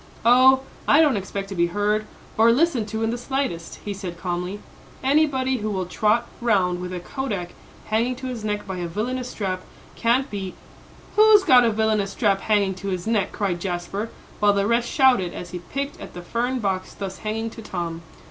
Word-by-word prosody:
"Oh, 260 +2 +7 0.3
I 290 - +6
don't 300 -6 +5
expect 195 0 -4
to - - -5
be 170 -1 +2
heard, 210 +3 0 0.3
or 225 +1 +6
listened 260 -4 +2
to 220 +1 -3
in 225 - +1
the 240 - -3
slightest," 260 -11 -3
he 205 - -2
said 185 -3 -6
calmly. 180 +2 -3 0.5
"Anybody 265 -2 +2
who 215 -1 -3
will 190 -3 -2
trot 215 +6 +1
round 185 -6 +2
with 180 0 -5
a 180 - -4
kodak 200 -3 -4 0.4
hanging 230 +4 0
to 260 +1 -8
his 245 -4 -4
neck 210 -1 -2
by 190 -2 -5
a 175 -1 -3
villanous 245 +8 -3
strap 185 -5 -3 0.3
can't 245 +4 +2
be 195 -3 -5 0.3
" - - -23
"Who's 425 -1 +7
got 250 -6 +6
a - - +4
villanous 215 -2 +1
strap 200 -4 +1
hanging 205 -3 +2
to 200 - -5
his 185 -2 -2
neck?" 220 -4 +1
cried 185 -4 -2
Jasper, 190 +4 -3 0.3
while 205 -1 +4
the 200 0 +1
rest 235 +2 +1
shouted 250 - +3
as 175 -1 -7
he 180 - -5
picked 275 +10 -5
at - - -9
the 175 - -7
fern 240 +7 -1
box 190 -5 -2
thus 195 -1 -6
hanging 225 +1 -3
to 225 - -10
Tom. 170 -5 -4
210 Hz, 200 wpm, -23 LUFS, 190-245 Hz, 0.5 s, Oh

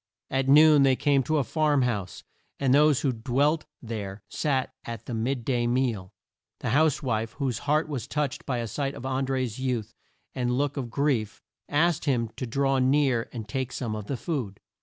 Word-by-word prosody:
At 135 0 0
noon 150 0 +7
they 135 -1 +5
came 140 0 +2
to 155 +5 0
a 145 - +2
farm 150 +2 +2
house, 105 -7 -3 0.4
and 135 -2 +2
those 150 -1 +5
who 135 - +1
dwelt 140 +7 +1 0.2
there 105 -3 -6
sat 135 -4 -1
at 115 -1 -7
the 125 - -5
mid 120 +2 -2
day 120 -3 +1
meal. 120 -7 0 0.5
The - - -1
house 155 +2 +3
wife, 110 -3 -1
whose 135 -5 -2
heart 155 +2 +3
was 140 -6 -4
touched 150 -3 -2
by 130 -3 0
a 120 -1 -2
sight 140 +4 -3
of 125 - -8
An 130 0 -1
dré's 130 -3 -2
youth 125 -5 -2 0.4
and 125 -1 -1
look 145 0 0
of 130 -5 -4
grief, 130 -5 -1 0.3
asked 165 +3 +2
him 120 -6 +1
to 130 - -3
draw 135 +2 +1
near 130 -2 +2
and 110 -4 -6
take 130 +3 -3
some 115 -5 -3
of 105 -1 -6
the 135 - -2
food. 120 - -4
130 Hz, 195 wpm, -27 LUFS, 115-145 Hz, 0.5 s, noon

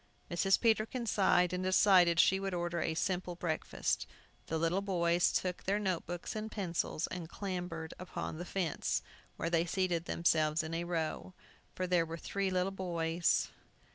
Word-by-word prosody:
Mrs. 190 +3 +3
Peterkin 230 +1 +1
sighed, 190 -4 +3
and 180 0 -1
decided 185 -2 +5
she 190 +2 +5
would 195 -1 -2
order 175 0 -1
a 160 - -1
simple 180 0 -1
breakfast. 170 -2 -2 0.4
The 160 - -1
little 165 +4 +1
boys 175 -3 +2
took 180 -1 -1
their 200 +2 +2
note 190 -6 -1
books 175 +4 -5
and 215 0 -4
pencils, 170 -4 -2
and 175 -3 -6
clambered 180 -5 -4
upon 175 -3 -5
the 175 - -4
fence, 175 -4 -1 0.3
where 165 - -2
they 170 0 +2
seated 175 -2 0
themselves 155 -2 +2
in 160 +1 -5
a 170 +1 -2
row. 170 +2 -3 0.4
For 185 - -1
there 175 -2 +2
were 165 +1 -5
three 195 +3 -2
little 185 +1 0
boys. 170 -3 0
175 Hz, 165 wpm, -33 LUFS, 165-190 Hz, 0.4 s, decided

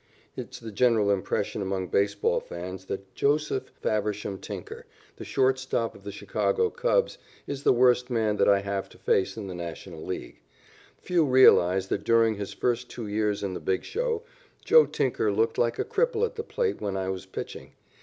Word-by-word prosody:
It - - -6
is - - -10
the 115 - -8
general 110 -2 +3
impression 100 +1 -1
among 95 -2 -2
baseball 100 +1 +1
fans 90 +2 -7
that 95 0 -6
Joseph 145 -1 0
Faversham 105 -2 -1
Tinker, - - -8 0.3
the - - -7
short 130 0 +2
stop 120 -3 -1
of 100 - -16
the 100 - -6
Chicago 450 - 0
Cubs, - - +1 0.3
is 140 -1 -5
the - - +4
worst 125 0 +4
man 110 -3 +1
that - - +4
I 100 -1 +4
have 100 -1 -3
to - - -17
face 95 +1 +1
in 105 - -5
the 95 - -6
National 85 -1 -7
League. 95 - -6 0.6
Few 175 -2 +1
realize 95 -9 +5
that 100 - -1
during 115 -1 +4
his 100 -2 -5
first 120 0 -1
two 115 - -6
years 105 0 -1
in 95 -2 -2
the - - -4
big 95 -1 -1
show 465 0 -2 0.4
Joe 475 -1 +7
Tinker 120 -5 0
looked 110 +3 0
like 120 0 +1
a - - -1
cripple 470 0 +1
at 465 - -5
the 450 - -4
plate 460 -1 -2
when 100 -1 -2
I 95 0 -2
was 95 0 -5
pitching. - - -7
105 Hz, 190 wpm, -27 LUFS, 95-130 Hz, 0.6 s, Joe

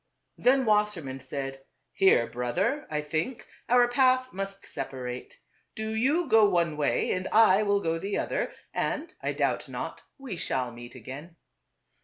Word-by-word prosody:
Then 260 +1 +4
Wassermann 210 -11 +1
said, 135 0 -6
" - - -49
Here, 190 -11 +5
brother, 175 - -1
I 150 -1 -1
think, 160 - -3 0.2
our 245 0 +6
path 255 +1 +3
must 195 0 -5
separate. 125 -2 -6 0.4
Do 220 0 -3
you 290 +10 +2
go 220 -4 +6
one 170 -4 +1
way, 150 +4 0
I 215 -2 +6
will 205 -1 +2
go 165 -2 -1
the 200 +3 -2
other; - - -1 0.2
and, 310 +3 -2
I - - -1
doubt - - -1
not, - - -5 0.2
we 265 - -6
shall 130 -5 -1
meet 120 +1 -11
again. 135 +8 -9
195 Hz, 150 wpm, -28 LUFS, 140-235 Hz, 0.4 s, our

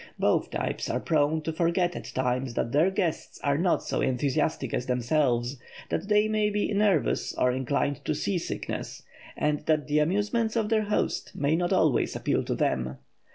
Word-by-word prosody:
Both - - +1
types - - -3
are - - 0
prone 155 0 +1
to 160 +1 -2
forget 175 +2 +1
at - - -6
times 125 -1 -1
that 115 - -1
their 155 +7 +4
guests 190 -4 -2
are 140 +1 +1
not 175 0 +2
so - - -2
enthusiastic 135 0 0
as 125 - -2
themselves; 125 0 +1 0.3
that - - -2
they 210 0 +4
may 215 -1 +1
be 210 0 -1
nervous 200 -6 +1
or 125 - +2
inclined 130 +2 -1
to 155 - 0
seasickness, 175 +3 -3 0.3
and 150 0 +1
that 155 -2 +2
the 150 0 +2
amusements 205 +8 +1
of 220 -2 +1
their 215 -1 +2
host 210 - -1
may 145 +2 +1
not 175 +2 0
always 160 -9 +2
appeal - - 0
to - - -1
them. 65 +1 -1
155 Hz, 175 wpm, -27 LUFS, 135-195 Hz, 0.3 s, their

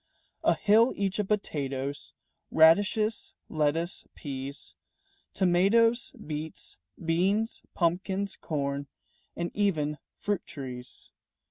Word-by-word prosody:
A - - +4
hill 220 +4 +5
each 200 0 -1
of 205 - 0
potatoes, 140 -9 -2 0.3
Radishes, 205 +7 +4
lettuce, 160 +3 0
peas, 140 -1 -6 0.6
Tomatoes, 205 +6 +4
beets, 155 - -6 0.3
beans, 195 +7 +1
pumpkins, 190 +3 0
corn, 140 -2 -2 0.5
And 170 0 -2
even 155 -8 +1 0.2
fruit 205 -3 -1
trees. 125 -3 -8
170 Hz, 90 wpm, -29 LUFS, 145-205 Hz, 0.6 s, hill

